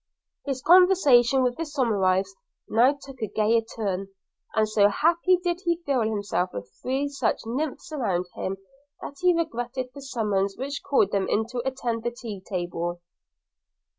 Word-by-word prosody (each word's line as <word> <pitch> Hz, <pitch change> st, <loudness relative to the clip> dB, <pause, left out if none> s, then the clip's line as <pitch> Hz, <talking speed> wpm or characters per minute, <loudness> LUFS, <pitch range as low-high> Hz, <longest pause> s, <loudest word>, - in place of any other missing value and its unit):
His 270 Hz, -2 st, -3 dB
conversation 295 Hz, -9 st, +6 dB
with 250 Hz, -1 st, 0 dB
the -, -, -5 dB
Miss 300 Hz, -3 st, -5 dB
Somerives 195 Hz, -6 st, +2 dB, 0.4 s
now 250 Hz, +6 st, +3 dB
took 270 Hz, -2 st, -12 dB
a 220 Hz, -, -1 dB
gayer 220 Hz, +3 st, +2 dB
turn; 200 Hz, -4 st, -4 dB, 0.5 s
and 220 Hz, 0 st, +3 dB
so 210 Hz, -1 st, +4 dB
happy 340 Hz, -, +3 dB
did 350 Hz, 0 st, -2 dB
he 340 Hz, -2 st, +1 dB
feel 275 Hz, -4 st, +1 dB
himself 205 Hz, -4 st, -1 dB
with 100 Hz, 0 st, -7 dB
three 270 Hz, +3 st, -1 dB
such 280 Hz, -1 st, -1 dB
nymphs 275 Hz, +7 st, -4 dB
around 195 Hz, -, -1 dB
him, 195 Hz, +1 st, -4 dB, 0.5 s
that 280 Hz, -, -7 dB
he 360 Hz, -1 st, +4 dB
regretted 255 Hz, -5 st, -3 dB
the 280 Hz, -, -10 dB
summons 210 Hz, -7 st, -1 dB
which 280 Hz, +2 st, -4 dB
called 260 Hz, -8 st, +2 dB
them 195 Hz, -1 st, 0 dB
in 220 Hz, -, +1 dB
to 245 Hz, 0 st, -3 dB
attend 245 Hz, -3 st, -2 dB
the 240 Hz, -, -1 dB
tea 230 Hz, -5 st, -8 dB
table. 175 Hz, -2 st, -3 dB
240 Hz, 165 wpm, -25 LUFS, 205-280 Hz, 0.5 s, conversation